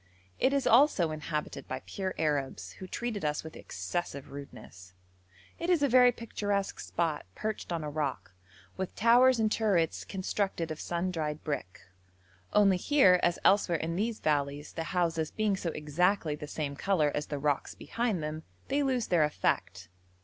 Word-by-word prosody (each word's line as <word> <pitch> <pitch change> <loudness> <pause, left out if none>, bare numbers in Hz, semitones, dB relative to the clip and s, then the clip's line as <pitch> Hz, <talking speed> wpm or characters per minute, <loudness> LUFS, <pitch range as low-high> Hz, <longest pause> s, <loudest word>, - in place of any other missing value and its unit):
It 265 - +3
is 275 -2 +1
also 230 - +5
inhabited 155 0 -4
by - - -5
pure 190 -1 -4
Arabs, 135 - -1
who 185 - -7
treated 225 -2 -4
us 150 0 -1
with 160 0 -9
excessive 135 - -5
rudeness. 95 -10 -11 0.6
It 335 - -2
is 340 -5 +3
a - - +5
very 250 -1 +6
picturesque 205 -4 -2
spot, 160 - -2
perched 215 -4 -4
on 165 -2 -2
a 150 - -3
rock, 145 -10 -3 0.4
with 190 -1 -4
towers 240 +3 +5
and 215 -1 +2
turrets 195 -9 +1
constructed 190 -3 -2
of 155 - -5
sun 175 +2 -2
dried 155 -3 -3
brick; 140 - -4 0.7
only 200 -3 +5
here, 185 -5 +5
as 175 0 +2
elsewhere 195 -4 +4
in 165 +1 -3
these 220 +4 -1
valleys, 145 -1 -1
the 165 - -4
houses 170 -3 0
being 215 -2 0
so 180 -3 -3
exactly 160 +2 0
the 150 0 -7
same 145 -1 -3
colour 155 -3 +1
as 150 - -2
the 145 - -3
rocks 145 0 -1
behind 225 -8 -2
them, 155 +1 -4 0.3
they 280 +2 +2
lose 255 -4 +1
their 170 -3 +3
effect. 95 - -1
170 Hz, 165 wpm, -30 LUFS, 150-210 Hz, 0.7 s, very